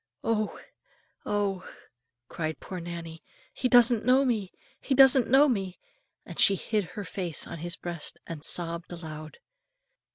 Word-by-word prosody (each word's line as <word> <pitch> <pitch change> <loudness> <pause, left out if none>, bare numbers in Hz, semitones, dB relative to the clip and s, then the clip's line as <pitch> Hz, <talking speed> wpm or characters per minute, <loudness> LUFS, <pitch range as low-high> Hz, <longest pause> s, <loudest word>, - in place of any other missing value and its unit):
"Oh! 215 -2 -1 0.7
oh!" 200 -3 -1 0.6
cried 160 +2 -4
poor 185 - -7
Nannie, 170 -1 -7 0.3
"he 250 - -1
doesn't 240 -2 +5
know 260 +3 +4
me, 215 -7 -1 0.3
he 270 - -1
doesn't 265 -1 +6
know 275 +4 +6
me;" 195 -8 -2 0.5
and - - -9
she 200 - +6
hid 210 +2 -1
her 205 - -3
face 180 -5 -2
on 165 - -8
his 175 +2 -3
breast 170 -3 -6
and 160 -3 -8
sobbed 170 0 -2
aloud. 155 -3 -8
190 Hz, 140 wpm, -28 LUFS, 170-235 Hz, 0.7 s, doesn't